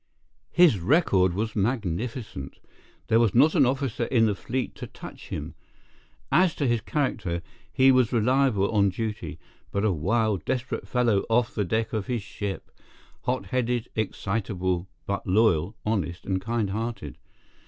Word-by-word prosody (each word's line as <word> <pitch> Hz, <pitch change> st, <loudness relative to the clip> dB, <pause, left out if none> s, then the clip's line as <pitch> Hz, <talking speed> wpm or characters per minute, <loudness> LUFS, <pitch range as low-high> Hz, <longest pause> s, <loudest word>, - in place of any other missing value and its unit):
His 170 Hz, -, +5 dB
record 95 Hz, -, +3 dB
was 110 Hz, +2 st, -2 dB
magnificent. 105 Hz, -, -2 dB, 0.5 s
There 115 Hz, 0 st, +3 dB
was 115 Hz, -3 st, +2 dB
not 145 Hz, +6 st, +6 dB
an -, -, +5 dB
officer 130 Hz, -2 st, -1 dB
in 115 Hz, -3 st, +3 dB
the 105 Hz, -, +2 dB
fleet 125 Hz, +6 st, -3 dB
to -, -, -6 dB
touch -, -, -11 dB
him. -, -, -5 dB, 0.8 s
As 170 Hz, +3 st, +4 dB
to 145 Hz, -, -1 dB
his 120 Hz, -3 st, +1 dB
character, 100 Hz, -, -2 dB, 0.3 s
he 130 Hz, 0 st, +5 dB
was 130 Hz, -3 st, +3 dB
reliable 120 Hz, -3 st, +2 dB
on 100 Hz, -3 st, +3 dB
duty, 110 Hz, +3 st, -4 dB, 0.3 s
but 100 Hz, +2 st, 0 dB
a 105 Hz, -, +3 dB
wild, 105 Hz, +3 st, 0 dB
desperate 125 Hz, -1 st, -3 dB
fellow 120 Hz, -5 st, +2 dB
off 115 Hz, +1 st, +2 dB
the 105 Hz, -, -1 dB
deck 110 Hz, +4 st, -1 dB
of 110 Hz, -3 st, -2 dB
his 120 Hz, -5 st, -2 dB
ship—hot 105 Hz, +4 st, -6 dB
headed, 125 Hz, -2 st, -1 dB
excitable, 95 Hz, -4 st, -2 dB, 0.2 s
but 100 Hz, 0 st, -3 dB
loyal, 95 Hz, -1 st, +3 dB
honest, 95 Hz, -6 st, -2 dB
and 95 Hz, -1 st, -1 dB
kind 110 Hz, -1 st, -1 dB
hearted. 110 Hz, -, -4 dB
110 Hz, 145 wpm, -26 LUFS, 100-125 Hz, 0.8 s, not